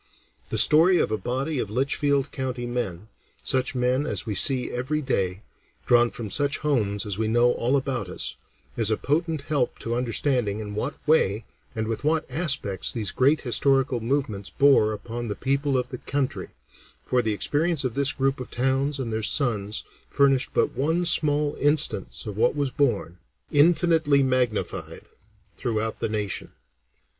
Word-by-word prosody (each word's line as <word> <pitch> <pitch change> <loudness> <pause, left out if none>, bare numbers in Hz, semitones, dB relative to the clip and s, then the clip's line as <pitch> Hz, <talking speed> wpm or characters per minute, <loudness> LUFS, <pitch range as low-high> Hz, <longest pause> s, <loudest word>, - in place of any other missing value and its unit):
The - - -2
story 170 +4 +6
of 110 - +1
a 110 - 0
body 135 +4 -2
of 105 - -3
Litchfield 140 +3 0
County 130 -2 -4
men, 110 -6 -4 0.4
such 130 0 0
men 125 +3 +1
as - - -3
we 110 - -3
see 125 +6 +1
every 130 +5 -2
day, 95 -9 -2 0.4
drawn 120 -1 +4
from 110 -4 -7
such 145 0 0
homes 110 -9 -1
as 100 -1 -4
we 110 - 0
know 120 +2 +3
all 125 +3 0
about 130 -8 -3
us, 90 - -4 0.4
is 115 -2 +2
a 110 - +1
potent 160 +1 -1
help 145 -4 -1
to 115 - -4
understanding 120 -3 0
in 105 -1 -6
what 105 - -3
way 110 -9 +2 0.3
and 110 -1 -2
with 115 +3 -3
what 155 +1 +1
aspects 135 - -1
these 110 -6 -3
great 140 +4 +2
historical 135 +1 +2
movements 115 -5 -2
bore 135 -6 +4
upon 115 +3 -5
the 105 - -3
people 140 +1 0
of 125 -1 -2
the 125 - -7
country, 140 -1 -3 0.5
for 125 -1 +1
the 110 -2 -1
experience 150 - 0
of 130 -3 -2
this 140 +1 +2
group 135 0 -1
of 125 - -7
towns 135 +3 0
and 120 -4 -4
their 110 - -1
sons 110 -4 +1 0.3
furnished 135 -2 +3
but - - +1
one 160 +6 0
small 150 -3 +2
instance 145 - +1
of 105 -2 -6
what 110 - +2
was 140 -2 -1
borne, 115 - -1 0.3
infinitely 160 -2 +4
magnified, 125 -4 -2 0.5
throughout 110 -3 -2
the - - -2
nation. 105 -3 -4
130 Hz, 165 wpm, -25 LUFS, 110-145 Hz, 0.5 s, story